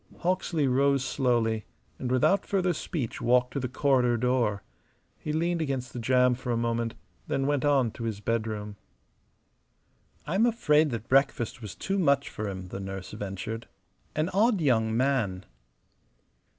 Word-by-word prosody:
Hawksley 175 -4 0
rose 135 +1 +2
slowly 120 -5 +1 0.4
and 125 - -3
without 130 +10 +3
further 185 -3 +1
speech 150 - -4
walked 125 +1 +3
to 140 - -1
the 125 -2 -3
corridor 125 -3 +2
door. 115 -4 +1 0.6
He 150 - -4
leaned 170 +2 0
against 135 -5 -3
the 125 - -5
jamb 125 +1 +3
for 125 0 -4
a 115 - +1
moment, 115 0 -1 0.3
then 135 - 0
went 145 -1 +1
on 135 -5 +3
to 115 - -6
his 110 -3 -3
bedroom. 110 -2 -3 1.5
"I'm 195 +10 +2
afraid 155 -10 +3
that 115 -2 -5
breakfast 135 -2 +1
was 105 -3 -7
too 195 +1 -2
much 140 -5 +2
for 105 -1 -4
him," 95 -1 -7
the 95 - -6
nurse 95 -1 -6
ventured. 105 +2 -5 0.5
"An 155 +3 0
odd 210 +2 +3
young 115 -7 +2
man." 120 -8 0
125 Hz, 150 wpm, -28 LUFS, 115-145 Hz, 1.5 s, without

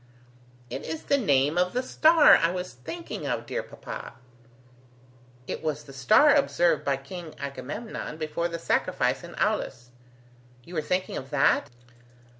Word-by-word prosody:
"It - - -5
is 160 0 -5
the 280 - +2
name 145 - +2
of 180 0 +1
the 250 +1 0
star 315 +3 +6
I 165 - +3
was 180 +1 -4
thinking 330 - -7
of, - - -2
dear - - -3
papa." 310 - -9 1.3
"It - - -5
was 150 -2 -2
the 140 -2 -13
star 215 - +5
observed 175 - +2
by 140 -1 0
King 165 +3 -9
Agamemnon 140 - -6
before 160 +2 -2
the 170 -1 -5
sacrifice 165 - 0
in - - -10
Aulis. 125 +1 -2 0.7
You 175 - -13
were 160 - 0
thinking 180 +4 -2
of 135 - -7
that? 145 0 +2
165 Hz, 150 wpm, -27 LUFS, 140-195 Hz, 1.3 s, star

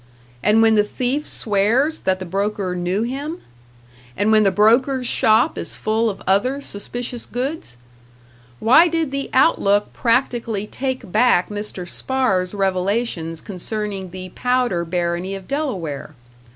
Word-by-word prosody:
And 215 +2 +4
when 225 0 +5
the 210 -1 +4
thief 255 +7 -2
swears 230 +9 +1
that 190 0 0
the 185 - -7
broker 195 +1 -2
knew 180 +4 -1
him? 280 +7 -4 0.8
And 205 +2 +2
when 215 0 +5
the 200 - +4
broker's 245 +7 +3
shop 230 +5 +3
is - - -5
full 220 +1 0
of 200 - -7
other 250 +9 +2
suspicious 240 0 -6
goods? 250 - -4 0.8
Why 310 +10 +6
did 325 -4 -1
the 275 0 -3
"Outlook" 205 -7 +3
practically 235 -4 0
take 255 -3 -4
back 215 -4 +3
Mr. 205 -3 -5
Spahr's 195 -5 0
revelations 190 -3 -1
concerning 200 0 -5
the 185 +1 -8
Powder 250 -5 0
barony 175 +2 -2
of 190 -1 -10
Delaware? 180 - -3
215 Hz, 135 wpm, -20 LUFS, 190-250 Hz, 0.8 s, Why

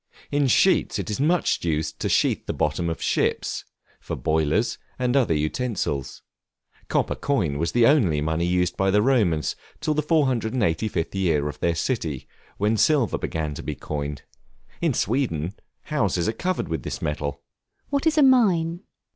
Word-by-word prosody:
In 145 -1 +2
sheets 125 - +3
it - - -3
is 105 - -3
much 165 +5 +1
used 80 -2 -1
to - - -1
sheathe - - +1
the - - -2
bottoms 80 +3 0
of 80 - -4
ships, - - 0 0.3
for - - -5
boilers, 80 +10 0 0.2
and 125 0 0
other 120 - +3
utensils. 75 - -2 0.6
Copper - - 0
coin 85 - -1
was 85 +1 -1
the 120 - +5
only 115 - +4
money 80 +3 0
used 90 0 +1
by 95 0 +1
the 105 +2 +3
Romans 105 - +2 0.2
till 155 - 0
the 150 - +1
485th 115 - 0
year 80 -7 +1
of 75 - -6
their 85 -1 +1
city, 80 - -2 0.3
when 105 +2 +1
silver 140 -3 +2
began 75 -2 -3
to - - -7
be - - -4
coined. 75 -2 -5 0.6
In - - +1
Sweden, 95 - 0 0.3
houses 100 - 0
are 110 - 0
covered 180 +9 -2
with 80 -4 -3
this - - -5
metal. 70 -1 -3 0.5
What 285 +2 0
is 315 0 +2
a 300 - +6
Mine? 185 -11 +4
95 Hz, 165 wpm, -24 LUFS, -, 0.6 s, a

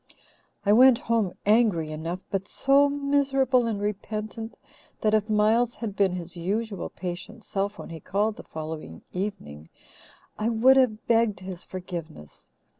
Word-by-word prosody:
"I 205 - +5
went 250 +1 +7
home 225 -6 0
angry 205 -8 +3
enough, 165 +4 -4
but 195 0 -2
so 280 +4 +4
miserable 275 -3 +2
and 215 -3 -2
repentant 215 +2 -4 0.4
that 215 -1 +2
if 215 0 +2
Miles 220 +3 +3
had 215 -4 -5
been 195 -3 +2
his 175 -1 -6
usual 200 +4 -3
patient 185 +5 -7
self 200 +1 -2
when - - -9
he 165 - -7
called 205 +6 -1
the - - -9
following 155 - -7
evening 80 - -5 0.7
I 215 +2 +1
would 240 +4 +5
have 235 -5 +2
begged 225 -5 +2
his 185 -2 -7
forgiveness. 170 - -8
210 Hz, 145 wpm, -26 LUFS, 180-230 Hz, 0.7 s, went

